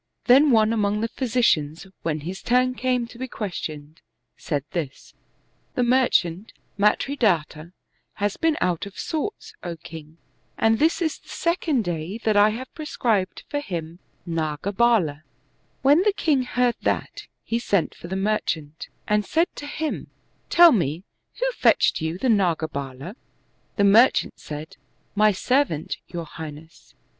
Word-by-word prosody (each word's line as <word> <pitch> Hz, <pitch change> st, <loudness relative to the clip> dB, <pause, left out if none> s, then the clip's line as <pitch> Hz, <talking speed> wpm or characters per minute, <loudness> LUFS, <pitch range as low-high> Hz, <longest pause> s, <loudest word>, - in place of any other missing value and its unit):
Then 275 Hz, +4 st, +6 dB
one 220 Hz, -2 st, +4 dB
among 210 Hz, -1 st, 0 dB
the 230 Hz, -, 0 dB
physicians, 225 Hz, -, 0 dB, 0.2 s
when 155 Hz, -2 st, -2 dB
his 180 Hz, +5 st, -6 dB
turn 255 Hz, +1 st, +2 dB
came 250 Hz, -1 st, 0 dB
to 235 Hz, 0 st, -14 dB
be 260 Hz, -, -3 dB
questioned, 155 Hz, -, -6 dB, 0.3 s
said 145 Hz, -3 st, -3 dB
this, 155 Hz, -6 st, -5 dB, 0.3 s
" -, -, -42 dB
The 250 Hz, -, +2 dB
merchant 225 Hz, -7 st, +2 dB, 0.2 s
Matridatta 200 Hz, -, +1 dB, 0.4 s
has 205 Hz, -1 st, -1 dB
been 325 Hz, -1 st, +1 dB
out 180 Hz, +1 st, 0 dB
of 200 Hz, -, -13 dB
sorts, 325 Hz, +7 st, -4 dB
O 175 Hz, -1 st, -5 dB
king, 160 Hz, 0 st, -11 dB, 0.4 s
and 225 Hz, 0 st, +3 dB
this 330 Hz, +3 st, +2 dB
is 315 Hz, -, -2 dB
the -, -, -22 dB
second 335 Hz, -7 st, 0 dB
day, 175 Hz, +2 st, -4 dB
that 215 Hz, -1 st, +2 dB
I 205 Hz, +1 st, +6 dB
have 245 Hz, +4 st, -6 dB
prescribed 235 Hz, -, -1 dB
for 290 Hz, -, -2 dB
him 170 Hz, -, -6 dB, 0.3 s
ndgabald," 165 Hz, +2 st, +1 dB, 0.6 s
When 290 Hz, +5 st, +6 dB
the 415 Hz, +1 st, +2 dB
king 290 Hz, -9 st, +1 dB
heard 245 Hz, -1 st, +1 dB
that, -, -, -2 dB, 0.2 s
he 230 Hz, -, -1 dB
sent 200 Hz, -7 st, 0 dB
for -, -, -11 dB
the 190 Hz, -, -4 dB
merchant, 170 Hz, -7 st, -2 dB, 0.2 s
and 210 Hz, 0 st, +2 dB
said 330 Hz, -, 0 dB
to 290 Hz, -, -6 dB
him, 310 Hz, +1 st, -3 dB, 0.2 s
" -, -, -42 dB
Tell 345 Hz, -1 st, +8 dB
me, 170 Hz, -, 0 dB, 0.4 s
who -, -, +1 dB
fetched -, -, +3 dB
you 160 Hz, +2 st, -2 dB
the 260 Hz, -, -1 dB
ndgabcUd?" 160 Hz, -, -1 dB, 0.6 s
The 200 Hz, -, +2 dB
merchant 220 Hz, +6 st, +4 dB
said, 150 Hz, +1 st, -8 dB, 0.4 s
"My 215 Hz, +1 st, +4 dB
servant, 205 Hz, -, 0 dB
your 170 Hz, -1 st, -5 dB
high 160 Hz, 0 st, -7 dB
ness." 155 Hz, +2 st, -15 dB
205 Hz, 150 wpm, -24 LUFS, 165-255 Hz, 0.6 s, Tell